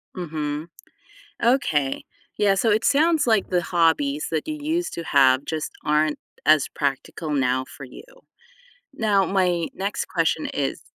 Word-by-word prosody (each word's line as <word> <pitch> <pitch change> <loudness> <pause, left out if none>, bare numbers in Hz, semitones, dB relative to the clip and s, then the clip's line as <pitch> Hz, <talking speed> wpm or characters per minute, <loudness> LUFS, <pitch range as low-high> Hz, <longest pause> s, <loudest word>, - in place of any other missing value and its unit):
Mhm. 155 -3 -4 0.8
Okay, 160 - +1 0.3
yeah, 200 -1 +3
so 225 +3 +1
it 220 +2 +1
sounds 300 +2 +3
like 220 -3 +2
the 180 -1 +1
hobbies 160 -4 +1
that 160 - -2
you 305 0 -3
used 330 +4 -2
to 170 - -5
have 135 -2 +4
just 155 -1 -4
aren't 150 0 +1 0.3
as 155 -1 +5
practical 145 +2 -3
now 130 -2 +1
for 140 - -12
you. 125 - -12 0.9
Now 205 -4 +2
my 180 -3 +1
next 195 +2 -3
question 165 -2 0
is 140 -2 -3
165 Hz, 145 wpm, -23 LUFS, 145-205 Hz, 0.9 s, as